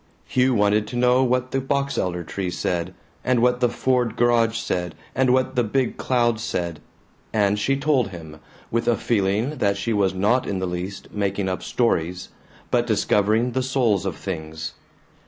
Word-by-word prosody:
Hugh 130 0 +2
wanted 105 0 +2
to 110 - -7
know 125 +1 +4
what 125 0 0
the 135 - 0
box 140 +1 -1
elder 90 -1 -1
tree 95 +3 -4
said, 90 0 -2 0.3
and 130 -1 +2
what 125 +1 +3
the 125 -1 +3
Ford 125 -2 0
garage 115 -1 +3
said, 90 -6 -2 0.2
and 130 -1 +2
what 130 +1 +1
the 125 - +3
big 125 +3 0
cloud 120 -3 +1
said, 85 -7 -3 0.5
and 105 -1 +2
she 135 +6 +1
told 140 -3 +2
him, 80 -4 -10 0.3
with 115 +1 0
a 120 - +3
feeling 110 +6 0
that 100 -3 +2
she 115 +3 -1
was 100 -2 +1
not 105 +7 +2
in 100 - -1
the 95 - -1
least 90 +2 -5
making 100 -1 -1
up 95 0 -2
stories, 90 -6 -1 0.4
but 120 0 +2
discovering 110 +2 +2
the 130 +2 0
souls 125 -7 +1
of 95 - -3
things. 80 -4 -5
110 Hz, 175 wpm, -23 LUFS, 95-125 Hz, 0.5 s, know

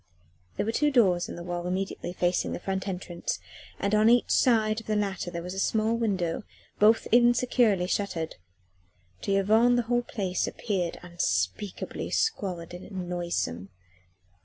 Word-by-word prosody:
There - - 0
were 225 - 0
two 295 +5 +2
doors 195 -10 +3
in - - -6
the 170 - -7
wall 175 0 -4
immediately 185 0 -3
facing 175 0 0
the - - -4
front 190 +1 -3
entrance, 180 -2 -3 0.4
and 200 +1 -1
on 215 +1 +5
each 240 0 +4
side 220 -3 +3
of - - -20
the 215 - 0
latter 195 -3 -1
there 170 -1 -5
was 180 +1 -5
a 190 - -4
small 220 +3 +1
window, 190 -8 -1 0.4
both 220 +2 +5
insecurely 240 -4 +4
shuttered. 180 -4 -2 0.8
To - - -2
Yvonne 220 +5 +4
the 245 - +2
whole 240 +1 +1
place 195 -6 -2
appeared 185 -7 -2
unspeakably 170 - -2
squalid 185 - -1
and 180 0 -6
noisome. 170 - -2
195 Hz, 155 wpm, -27 LUFS, 175-225 Hz, 0.8 s, on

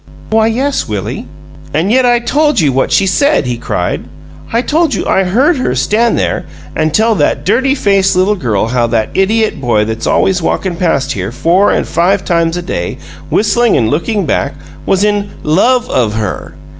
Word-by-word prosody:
"Why, 220 0 +3
yes, 265 +5 -1
Willie." 105 +3 -4 0.5
"And 170 +7 +1
yet 255 +1 +3
I 240 0 +4
told 295 +2 +1
you 145 -5 +2
what 135 - 0
she 195 - +3
said!" 280 - +2
he 125 -1 -2
cried. - - -2 0.5
"I 235 +2 0
told 315 0 +1
you - - -3
I 190 - +2
HEARD 265 - +2
her 190 - -1
stand 215 - +1
there - - -1 0.3
and 155 0 0
tell 225 +7 +2
that - - 0
dirty 260 +7 +2
faced 195 -6 +2
little 185 +3 +2
girl 115 - -1
how 120 -1 +1
that 115 -2 0
idiot 215 -1 0
boy 110 -4 +1
that's 110 +1 -4
always 190 -1 +1
walkin' 180 +2 -1
past 145 -6 0
here 100 -5 -3
four 175 +9 +2
or - - +1
five 185 +4 0
times 170 -1 0
a 175 - -4
day, 85 - -4 0.3
whistling 235 +2 +2
and 110 -2 +1
looking 195 +6 -1
back, 140 -1 -1 0.3
was 195 +1 +2
in 205 -1 0
'love 230 +11 +2
of' 110 -4 0
her! 105 -4 -4
190 Hz, 185 wpm, -13 LUFS, 135-225 Hz, 0.5 s, I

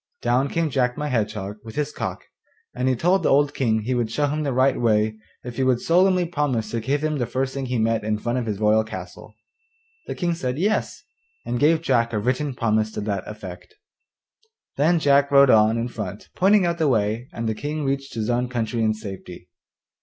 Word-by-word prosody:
Down 125 +4 +2
came 165 -2 -1
Jack 125 -2 0
my 150 0 -2
Hedgehog 105 -4 -2
with 110 -1 -10
his 150 0 -1
cock, - - -5 0.5
and 125 -1 0
told 185 +3 +3
the - - +1
old 145 +1 +3
King 110 -6 +1
he 125 +5 -2
would 120 -3 0
show 130 +6 0
him 150 +2 -1
the 145 -2 -1
right 130 +1 +2
way 110 -1 +2 0.3
if 120 -1 -8
he 135 - +1
would 130 -2 +2
solemnly 180 +3 +3
promise 140 -10 -1
to 115 - -1
give 140 +6 -1
him 155 -2 -1
the 120 - -1
first 130 0 -2
thing 135 -1 -4
he 125 0 -1
met 115 0 +1
in 105 0 0
front 120 +3 -2
of 120 - -4
his 105 -2 -3
royal 110 +1 +3
castle. 95 +1 -9 0.7
The - - -4
King 175 -2 -1
said 130 -5 -3
'Yes,' 205 +6 -1 0.4
and 120 - -2
gave 160 +2 +3
Jack 115 -5 +1
a - - 0
written 130 +5 -1
promise 110 -2 +1
to - - -4
that 100 -2 -3
effect. 100 - -9 1.0
Then 160 +5 +3
Jack 140 -2 +3
rode 140 -2 +6
on 110 +1 +4
in 115 +1 -1
front 105 -4 -7
pointing 195 +1 +4
out 170 0 -1
the 160 - +2
way, 110 0 0
and 115 0 -4
the 110 - 0
King 145 +6 -4
reached 135 -1 -3
his 110 -2 -2
own 120 +1 0
country 115 -1 -2
in 110 -1 +2
safety. 95 -4 -9
125 Hz, 215 wpm, -23 LUFS, 110-145 Hz, 1.0 s, rode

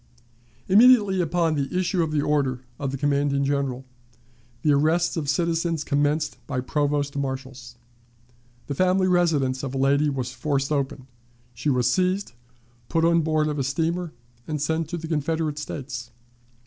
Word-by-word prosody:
Immediately 205 -2 +6
upon 170 -1 +1
the 145 +3 -2
issue 185 0 +1
of 160 -2 -1
the 150 -2 +1
order 140 -4 0 0.2
of 140 - -2
the 135 - -3
commanding 140 0 +1
General, 135 -2 -1 0.8
the 150 - +4
arrests 160 +4 +2
of 150 -4 -2
citizens 165 +1 0
commenced 150 +1 0
by 140 -3 -2
provost 145 +2 -1
marshals. 130 -3 -5 0.9
The 145 - -4
family 185 +4 +2
residence 155 -8 +2
of 135 -1 -5
a - - -1
lady 140 +2 +3
was 130 -3 -3
forced 140 -1 -1
open; 140 -2 -2 0.5
she 120 +6 -2
was 125 -3 +2
seized, 185 +6 +1 0.6
put 165 -1 +2
on 170 0 +4
board 155 -1 +1
of 150 -1 -2
a - - +1
steamer, 165 +5 -1 0.4
and 155 -1 -2
sent 160 +2 -1
to 175 - -3
the 165 0 -6
Confederate 155 -1 -1
States. 130 -5 -6
150 Hz, 155 wpm, -24 LUFS, 140-165 Hz, 0.9 s, Immediately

